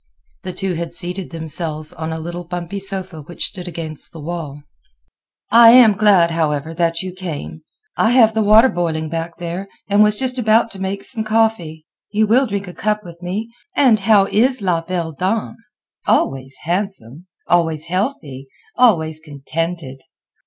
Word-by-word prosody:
The 185 Hz, -, -5 dB
two 190 Hz, +1 st, -3 dB
had 170 Hz, 0 st, -5 dB
seated 180 Hz, +1 st, -4 dB
themselves 160 Hz, -1 st, -3 dB
on 160 Hz, -2 st, -5 dB
a 160 Hz, -, -3 dB
little 175 Hz, +2 st, -6 dB
bumpy 175 Hz, +2 st, -5 dB
sofa 190 Hz, -4 st, -5 dB
which 170 Hz, +4 st, -5 dB
stood 180 Hz, -3 st, -5 dB
against 160 Hz, -3 st, -5 dB
the 165 Hz, -, -11 dB
wall. 150 Hz, -3 st, -6 dB, 0.9 s
"I 230 Hz, 0 st, +9 dB
am 240 Hz, -4 st, +8 dB
glad, 195 Hz, -5 st, +4 dB
however, 160 Hz, -1 st, -1 dB
that 165 Hz, +1 st, 0 dB
you 185 Hz, -1 st, -6 dB
came. 150 Hz, -, -7 dB, 0.3 s
I 220 Hz, -, +2 dB
have 230 Hz, -3 st, +5 dB
the 220 Hz, -, +1 dB
water 215 Hz, +4 st, +6 dB
boiling 160 Hz, -4 st, -2 dB
back 165 Hz, +1 st, -4 dB
there, 175 Hz, +3 st, -5 dB, 0.2 s
and 205 Hz, +1 st, +3 dB
was 210 Hz, 0 st, +4 dB
just 255 Hz, +1 st, -1 dB
about 225 Hz, 0 st, +3 dB
to 195 Hz, -, -9 dB
make 195 Hz, +1 st, -3 dB
some 225 Hz, -4 st, -4 dB
coffee. 215 Hz, -8 st, 0 dB, 0.2 s
You 215 Hz, +1 st, +2 dB
will 250 Hz, +5 st, +3 dB
drink 200 Hz, -2 st, -4 dB
a 180 Hz, -, -8 dB
cup 210 Hz, +2 st, -1 dB
with 170 Hz, -1 st, -12 dB
me. 210 Hz, +6 st, -4 dB, 0.2 s
And 250 Hz, -7 st, +4 dB
how 200 Hz, -1 st, +4 dB
is 250 Hz, +6 st, +2 dB
la 180 Hz, -5 st, 0 dB
belle 170 Hz, -1 st, -3 dB
dame? 185 Hz, -, -2 dB, 0.5 s
Always 135 Hz, 0 st, 0 dB
handsome! 175 Hz, -, -4 dB, 0.2 s
always 160 Hz, -3 st, +1 dB
healthy! 165 Hz, -, -3 dB, 0.3 s
always 160 Hz, -11 st, +3 dB
contented!" 155 Hz, -1 st, -5 dB
175 Hz, 165 wpm, -19 LUFS, 160-210 Hz, 0.9 s, I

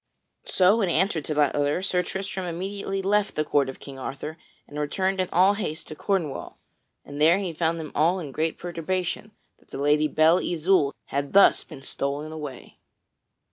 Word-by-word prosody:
So 195 Hz, +5 st, +4 dB
in 190 Hz, -, +1 dB
answer 175 Hz, -1 st, +1 dB
to 150 Hz, -, -3 dB
that 145 Hz, -2 st, +3 dB
letter, 145 Hz, +5 st, 0 dB
Sir 180 Hz, -2 st, +1 dB
Tristram 190 Hz, 0 st, -4 dB
immediately 195 Hz, +3 st, -3 dB
left 205 Hz, +1 st, +1 dB
the 155 Hz, -, 0 dB
court 140 Hz, -2 st, +2 dB
of 135 Hz, -, -8 dB
King 135 Hz, -1 st, -10 dB
Arthur 140 Hz, +5 st, -6 dB, 0.3 s
and 145 Hz, +1 st, -7 dB
returned 190 Hz, +6 st, 0 dB
in 185 Hz, -, -2 dB
all 185 Hz, +4 st, +5 dB
haste 180 Hz, -6 st, -4 dB
to 155 Hz, -, -7 dB
Cornwall, 170 Hz, -4 st, -2 dB, 0.5 s
and 145 Hz, +1 st, -7 dB
there 165 Hz, +4 st, +6 dB
he 190 Hz, -4 st, -3 dB
found 165 Hz, +1 st, 0 dB
them 155 Hz, -2 st, -6 dB
all 165 Hz, +5 st, +3 dB
in 150 Hz, -6 st, -6 dB
great 160 Hz, +4 st, -1 dB
perturbation 175 Hz, +4 st, -3 dB, 0.3 s
that -, -, -28 dB
the -, -, -7 dB
Lady 150 Hz, +2 st, +3 dB
Belle 160 Hz, +3 st, +4 dB
Isoult 170 Hz, -3 st, +1 dB
had 140 Hz, 0 st, -2 dB
thus 200 Hz, 0 st, +6 dB
been 135 Hz, -, -12 dB
stolen 140 Hz, +3 st, -3 dB
away. 150 Hz, -5 st, -8 dB
165 Hz, 180 wpm, -25 LUFS, 150-190 Hz, 0.5 s, there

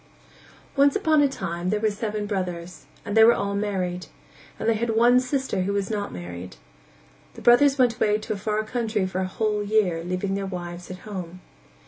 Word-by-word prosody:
Once 280 Hz, 0 st, +4 dB
upon 315 Hz, -7 st, +3 dB
a 285 Hz, -, +5 dB
time 180 Hz, -9 st, -4 dB
there 210 Hz, +2 st, +1 dB
were 215 Hz, 0 st, +1 dB
seven 210 Hz, 0 st, -3 dB
brothers, 180 Hz, -3 st, -4 dB, 0.2 s
and 205 Hz, -1 st, -3 dB
they 225 Hz, -, +8 dB
were 235 Hz, +1 st, +7 dB
all 200 Hz, 0 st, -2 dB
married, 190 Hz, -3 st, -2 dB, 0.5 s
and 220 Hz, -, -2 dB
they 230 Hz, -, +4 dB
had 230 Hz, +2 st, -2 dB
one 240 Hz, +2 st, +5 dB
sister 260 Hz, -5 st, -1 dB
who 195 Hz, +2 st, -1 dB
was 200 Hz, +1 st, -1 dB
not 205 Hz, -2 st, -2 dB
married. 90 Hz, -3 st, -8 dB, 0.8 s
The -, -, -10 dB
brothers 275 Hz, +4 st, +6 dB
went 245 Hz, -3 st, +3 dB
away 210 Hz, -3 st, +2 dB
to 215 Hz, 0 st, -4 dB
a -, -, -4 dB
far 210 Hz, +2 st, -1 dB
country 220 Hz, -3 st, -1 dB
for 185 Hz, 0 st, -3 dB
a 185 Hz, -, -1 dB
whole 210 Hz, +2 st, -1 dB
year, 200 Hz, -5 st, +1 dB
leaving 185 Hz, +2 st, -2 dB
their 195 Hz, 0 st, -2 dB
wives 175 Hz, -1 st, -7 dB
at 185 Hz, 0 st, -9 dB
home. 185 Hz, -4 st, -7 dB
205 Hz, 195 wpm, -24 LUFS, 185-225 Hz, 0.8 s, they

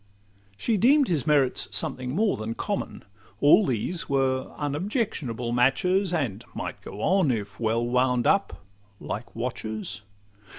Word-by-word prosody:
She 225 Hz, -, 0 dB
deem'd 270 Hz, +7 st, +4 dB
his 160 Hz, -4 st, 0 dB
merits 145 Hz, -4 st, +2 dB
something 130 Hz, +1 st, -3 dB
more 210 Hz, +2 st, +2 dB
than 110 Hz, +1 st, -4 dB
common: -, -, -4 dB, 0.4 s
All 150 Hz, -, +6 dB
these 135 Hz, +9 st, -1 dB
were 135 Hz, -1 st, 0 dB
unobjectionable 145 Hz, -, -2 dB
matches, 165 Hz, +11 st, +2 dB
And 120 Hz, -, -2 dB
might -, -, -5 dB
go 105 Hz, -, -8 dB
on, 185 Hz, -5 st, +3 dB
if 105 Hz, -5 st, -3 dB
well 115 Hz, +1 st, +1 dB
wound 125 Hz, 0 st, +2 dB
up, 100 Hz, -, +1 dB, 0.3 s
like 110 Hz, +4 st, -6 dB
watches. 110 Hz, -3 st, -4 dB
130 Hz, 130 wpm, -26 LUFS, 115-180 Hz, 0.4 s, All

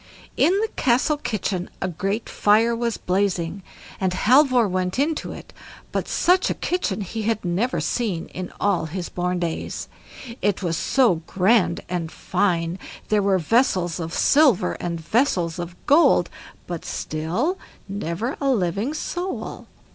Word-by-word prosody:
In 340 Hz, -, +4 dB
the 445 Hz, -, +1 dB
castle 270 Hz, +2 st, +2 dB
kitchen 195 Hz, -8 st, -3 dB
a 190 Hz, -, -1 dB
great 195 Hz, +5 st, -2 dB
fire 225 Hz, +3 st, +3 dB
was 235 Hz, -1 st, -1 dB
blazing, 185 Hz, -1 st, -1 dB, 0.4 s
and 185 Hz, -2 st, 0 dB
Halvor 255 Hz, +2 st, +4 dB
went 185 Hz, +1 st, -1 dB
into 295 Hz, +3 st, 0 dB
it, -, -, -10 dB, 0.4 s
but -, -, -2 dB
such 365 Hz, +2 st, +3 dB
a -, -, -1 dB
kitchen 280 Hz, -, -1 dB
he 220 Hz, +4 st, -4 dB
had 215 Hz, -2 st, -1 dB
never 195 Hz, +9 st, 0 dB
seen 205 Hz, -9 st, -1 dB
in 185 Hz, 0 st, -6 dB
all 200 Hz, -5 st, +1 dB
his 175 Hz, +2 st, -5 dB
born 180 Hz, 0 st, -1 dB
days. 170 Hz, -2 st, -3 dB, 0.5 s
It 205 Hz, -1 st, 0 dB
was 170 Hz, -2 st, 0 dB
so 225 Hz, -5 st, +2 dB
grand 190 Hz, -2 st, +2 dB
and 170 Hz, -3 st, -3 dB
fine; 180 Hz, -2 st, 0 dB, 0.3 s
there 210 Hz, -1 st, +3 dB
were 195 Hz, -1 st, +3 dB
vessels 185 Hz, -, +1 dB
of 165 Hz, -1 st, -4 dB
silver 255 Hz, -, +4 dB
and 170 Hz, -1 st, -3 dB
vessels 175 Hz, -, +1 dB
of 175 Hz, 0 st, -5 dB
gold, 310 Hz, +4 st, +4 dB, 0.3 s
but 175 Hz, -2 st, -5 dB
still 180 Hz, -, -2 dB, 0.3 s
never 200 Hz, -, -3 dB
a 275 Hz, -, +1 dB
living 210 Hz, -, 0 dB
soul. 355 Hz, +4 st, -4 dB
195 Hz, 145 wpm, -23 LUFS, 175-240 Hz, 0.5 s, In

